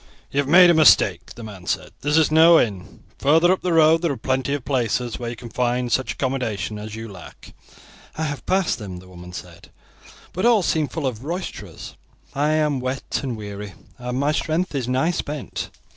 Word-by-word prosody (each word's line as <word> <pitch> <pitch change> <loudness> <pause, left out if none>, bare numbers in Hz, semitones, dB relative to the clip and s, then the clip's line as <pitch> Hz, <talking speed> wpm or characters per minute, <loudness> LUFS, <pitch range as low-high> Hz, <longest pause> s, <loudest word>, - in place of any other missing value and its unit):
"You 140 - 0
have 140 - 0
made 175 +3 +7
a - - +4
mistake," 155 -3 +4
the 120 - -9
man 100 -5 -10
said; - - -2
"this 150 +2 +1
is 160 -1 +3
no 165 +1 +7
inn. 100 -6 -3 0.2
Further 165 +5 +4
up 190 - 0
the 180 - -1
road 160 0 +5
there 170 -3 0
are 135 - -4
plenty 130 +4 -1
of 140 - -7
places 125 -3 -1
where 120 -1 -4
you 120 - -6
can 120 0 -10
find 125 0 -1
such 130 - 0
accommodation 115 -6 -3
as 105 +1 -7
you 115 0 -7
lack." 95 -4 -13 0.6
"I 160 - -2
have 145 -2 -4
passed 190 -6 +1
them," 95 -4 -7
the 90 +1 -13
woman 90 -1 -12
said, 90 - -10 0.6
"but 185 - -3
all 235 -5 +4
seemed 155 -3 0
full 160 -3 -3
of 125 -3 -3
roisterers. 175 +5 -6 0.4
I 150 +2 +1
am 150 -3 +1
wet 130 +1 -3
and 130 -5 -4
weary, 100 -1 -8 0.2
and 125 +1 -3
my 145 +2 +2
strength 160 +3 -1
is 130 -4 -2
nigh 130 +7 +1
spent. 150 -4 -5
135 Hz, 205 wpm, -22 LUFS, 115-155 Hz, 0.6 s, made